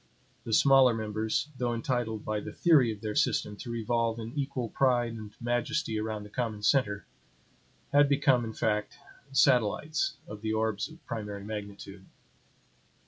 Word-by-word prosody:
The 115 - -5
smaller 135 -1 +6
members, 110 +5 -2
though 120 -1 0
entitled 115 -3 -2
by 110 -1 -1
the - - -7
theory 145 -9 +4
of 105 -2 -8
their 110 -1 -3
system 105 0 +1
to 120 - -8
revolve 115 0 0
in 115 +1 -6
equal 135 -4 -2
pride 120 -3 +2
and 110 -2 -8
majesty 120 0 -1
around 110 -1 -3
the 105 - -12
common 110 -4 -3
center, 105 -6 +2 0.9
had 145 0 +6
become, 140 -3 +3
in 110 -1 -5
fact, 105 -1 -1 0.3
satellites 135 +3 +2
of 105 0 -8
the 110 0 -1
orbs 110 0 -1
of 160 +1 -16
primary 105 -4 -5
magnitude. 100 -2 -8
115 Hz, 150 wpm, -29 LUFS, 105-125 Hz, 0.9 s, smaller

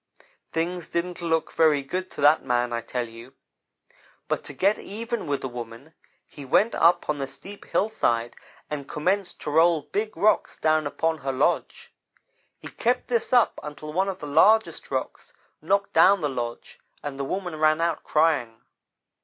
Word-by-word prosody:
"Things 170 +1 -3
didn't 175 +1 -3
look 160 -1 0
very 155 -3 +3
good 185 +6 -4
to - - -8
that 150 +2 +5
man, 125 -1 0
I 115 - -1
tell 120 0 -3
you, 115 +4 -13 0.9
but - - -2
to 145 - -6
get 195 +9 +2
even 230 -1 -5
with 140 -1 -1
the - - -3
woman, 120 +4 -9 0.3
he 145 - -12
went 200 - +2
up 170 +2 +3
on 150 -1 -1
the 135 - -2
steep 200 +8 -9
hillside 120 - 0 0.3
and 145 -2 -6
commenced 185 +5 -1
to - - -4
roll 165 0 +4
big 210 +6 -3
rocks 210 +4 +2
down 155 -1 +2
upon 160 +2 -1
her 135 0 -2
lodge. 130 +2 -1 0.6
He - - -10
kept 250 +2 -1
this 235 -2 0
up 245 -3 +3
until 150 +1 -8
one 190 +3 +1
of 190 - -4
the 150 - -8
largest 210 +10 +3
rocks - - -4 0.3
knocked 200 +4 0
down 195 0 +6
the 150 - 0
lodge, 120 -3 -6 0.2
and 140 -1 -6
the - - -1
woman 180 +2 -4
ran 155 0 +3
out, 165 -1 -1
crying. 150 -8 +1
155 Hz, 170 wpm, -25 LUFS, 140-185 Hz, 0.9 s, down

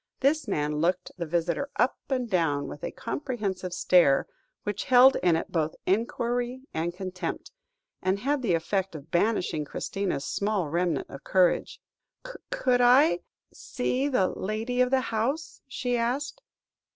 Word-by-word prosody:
This 290 +3 +2
man 150 0 -1
looked 180 +3 0
the 170 -2 -4
visitor 170 - -1
up 250 - +2
and 255 -3 0
down 165 -8 0
with 145 - -9
a - - -2
comprehensive 210 -9 -4
stare, 175 -5 +4 0.4
which 205 -2 -3
held 255 +1 +7
in 175 -2 +3
it 165 - -3
both 160 -2 0
enquiry 240 +4 -1
and 165 +2 -1
contempt, 185 +1 -5 0.5
and 185 +1 +1
had 275 +6 0
the 195 -9 +2
effect 190 +2 -1
of 150 0 -10
banishing 175 -4 +1
Christina's 165 -1 -3
small 200 -6 -1
remnant 170 -3 0
of 135 - -9
courage. 185 -2 +2 0.7
"Could 255 - +1
I 255 +6 +5 0.3
see 260 +1 -2
the 250 -10 +2
lady 225 +5 -2
of 250 - +3
the 265 0 +3
house?" 270 +9 -2
she 250 -2 -2
asked. 265 - -2
200 Hz, 145 wpm, -27 LUFS, 175-250 Hz, 0.7 s, held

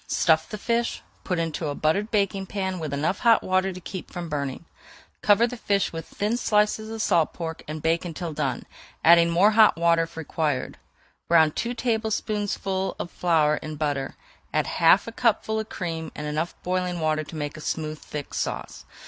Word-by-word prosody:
Stuff 160 -1 +2
the 215 - -5
fish, 235 +2 -1 0.2
put 180 - -1
into 165 -1 -2
a 145 - -3
buttered 195 +9 +1
baking 195 -2 0
pan 190 -2 -3
with 155 -3 -4
enough 150 +7 -1
hot 230 -2 +4
water 185 +1 +1
to 185 - -8
keep 185 +1 -7
from 175 -2 -6
burning. 140 +1 -3 0.6
Cover 210 +3 +5
the 245 +1 -4
fish 200 -5 0
with 165 0 -6
thin 215 +4 -1
slices 215 -1 +1
of 225 -1 -3
salt 165 -2 +2
pork 165 -2 -5
and 155 0 -6
bake 165 +1 +2
until 170 -1 -5
done, 140 -5 -2 0.4
adding 170 +1 +7
more 180 +5 +5
hot 215 -3 +6
water 170 0 +3
if 165 0 -5
required. 150 -4 -2 0.5
Brown 160 -2 +5
two 235 +9 -3
tablespoonfuls 215 -4 -1
of 175 - -5
flour 155 -4 +2
in 155 0 -6
butter, 145 -3 -2 0.4
add - - +1
half 170 +4 +4
a 230 - -6
cupful 220 -2 +1
of 220 - -5
cream, 165 -2 -4
and 150 - -5
enough 155 +3 -2
boiling 180 -1 -1
water 155 -1 0
to 155 +2 -10
make 145 -1 -4
a 155 - -9
smooth 155 0 -3
thick 145 -2 -7
sauce. - - -4
170 Hz, 185 wpm, -25 LUFS, 155-205 Hz, 0.6 s, adding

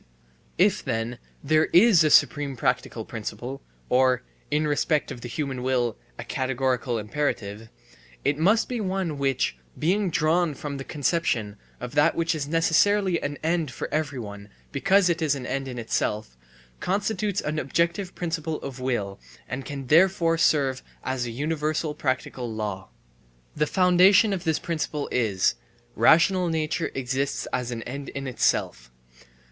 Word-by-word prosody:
If 190 +2 +3
then 120 -1 -3 0.2
there 155 +2 +3
is 185 -2 +6
a 155 - +3
supreme 145 -1 +4
practical 125 -3 -1
principle 120 +4 -6 0.3
or, 125 -1 +3 0.3
in 150 +1 +1
respect 150 0 +1
of 120 - -7
the 120 - -6
human 135 -1 -3
will, 125 -3 0 0.2
a - - -6
categorical 130 -2 -1
imperative, 110 -2 -3 0.6
it 145 +1 +1
must 205 +7 +3
be 245 -3 -3
one 185 -6 -2
which, 135 - 0 0.2
being 190 +4 +1
drawn 160 0 +1
from 140 +1 -5
the 135 - -5
conception 135 -8 -1 0.2
of 125 0 -6
that 150 +3 +3
which 165 0 +1
is 150 -3 -3
necessarily 170 +4 +2
an 145 0 -3
end 165 -2 0
for 125 - -6
everyone 120 -10 -4 0.2
because 190 +7 +3
it 170 -1 0
is 150 -3 +2
an 130 -3 -6
end 135 +1 -3
in 125 -2 -6
itself, 110 - -2 0.4
constitutes 205 +1 -1
an 155 +1 -2
objective 170 +6 -1
principle 165 -2 -3
of 135 -2 -6
will, 120 -7 -2 0.3
and 130 0 -5
can 140 0 -6
therefore 165 +3 +4
serve 140 -5 +2 0.2
as 130 -2 -2
a - - -4
universal 150 +4 -1
practical 130 -3 -2
law. 105 -3 -4 0.7
The 150 0 +1
foundation 185 +4 +5
of 180 -3 -4
this 160 -1 +2
principle 155 -3 -3
is: 105 - +2 0.4
rational 180 - +4
nature 160 +1 -1
exists 135 +1 -2
as 125 -1 -1
an 115 -2 -4
end 140 +3 -6
in 135 0 -6
itself. 60 - 0
145 Hz, 150 wpm, -25 LUFS, 125-165 Hz, 0.7 s, is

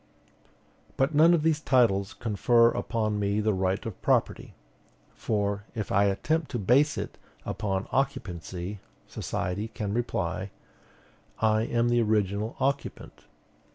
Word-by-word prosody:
But 135 +4 +1
none 165 +4 +6
of 155 - -1
these 160 -1 +2
titles 110 -9 +2
confer 115 +1 +3
upon 110 -2 -1
me 100 +1 0
the 110 0 +1
right 95 +1 -1
of 115 -4 -7
property. - - 0 0.6
For, 100 -1 -2
if 110 -3 -4
I 100 +1 +4
attempt 150 +11 0
to 125 - -3
base 130 +8 +3
it - - -5 0.3
upon 95 -2 -2
occupancy, 95 -7 -3 0.3
society 100 +5 -3
can 110 -3 -4
reply, 95 -5 -2 0.9
"I 110 -1 +2
am 120 0 +1
the 120 0 +3
original 105 0 0
occupant." 140 +2 -3
110 Hz, 125 wpm, -27 LUFS, 100-120 Hz, 0.9 s, none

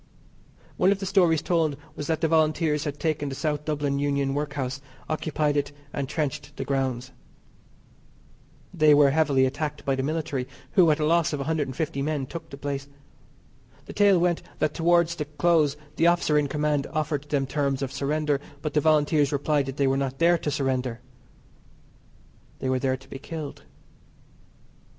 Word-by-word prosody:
One 190 - +4
of 200 - +2
the 195 - -5
stories 180 -5 +3
told 160 -5 +1 0.2
was 145 - -5
that 160 -1 -1
the 165 - +3
Volunteers 155 -1 +2
had 145 -1 -4
taken 155 -3 -1
the 135 - -5
South 150 0 -2
Dublin 145 -2 -1
Union 140 -1 0
Workhouse, 140 -2 -3 0.3
occupied 155 -1 -1
it, 145 0 0 0.2
and 140 -2 -3
trenched 150 -4 -3
the - - -3
grounds. 130 -2 -1 1.6
They 155 -4 +5
were 145 -1 +6
heavily 140 -3 +3
attacked 145 +2 -3
by 135 - +1
the 130 - -1
military, 145 -3 -2 0.2
who, 180 -5 +5
at 150 - +2
a 150 - +1
loss 170 0 +2
of 145 - -2
150 150 -1 -2
men, 145 -1 -1
took 165 +5 -8
the 140 - -9
place. 140 0 -4 1.0
The - - -9
tale 200 -2 +5
went 175 -1 +1 0.2
that 155 -1 0
towards 170 0 +3
the 155 -3 -4
close 150 -1 +2 0.2
the 165 - +4
officer 170 -3 +3
in 150 -1 +3
command 150 -1 0
offered 150 -2 -2
them 140 -2 +1
terms 140 -1 -1
of 135 - -3
surrender, 145 0 0 0.2
but 150 - -2
the 150 - +3
Volunteers 150 -1 +3
replied 145 -1 +1
that 135 +1 -6
they 140 - +2
were 135 0 +2
not 135 -1 -2
there 170 +3 +4
to 150 - -2
surrender. 130 -4 -1 1.6
They 130 - -3
were 130 0 +1
there 130 0 0
to 135 - -18
be 135 - -8
killed. 155 -1 -7
150 Hz, 175 wpm, -26 LUFS, 140-160 Hz, 1.6 s, were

